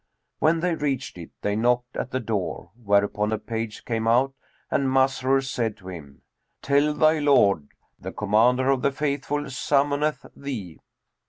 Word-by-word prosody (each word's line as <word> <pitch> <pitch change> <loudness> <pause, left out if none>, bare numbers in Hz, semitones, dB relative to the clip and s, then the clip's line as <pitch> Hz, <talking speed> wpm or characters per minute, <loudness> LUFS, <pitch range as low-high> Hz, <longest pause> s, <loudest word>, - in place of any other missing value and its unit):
When 160 +1 +3
they 180 0 +1
reached 135 - -3
it, 85 - -9
they 105 0 0
knocked 125 +2 +1
at 125 - -3
the 130 - -2
door, 105 -6 -3
whereupon 105 -1 +1
a 110 - +1
page 110 0 -5
came 115 -1 -1
out 130 +4 +3 0.4
and 135 - +1
Masrur 135 0 +2
said 120 -5 -2
to 95 -1 -11
him, 75 -6 -11 0.4
"Tell 145 +2 +2
thy 155 +1 +4
lord, 100 - +3 0.3
The - - -6
Commander 120 +6 +3
of 135 -2 +1
the 140 - +2
Faithful 145 +1 -2
summoneth 145 +3 0
thee." 110 - -6
125 Hz, 155 wpm, -25 LUFS, 105-140 Hz, 0.4 s, thy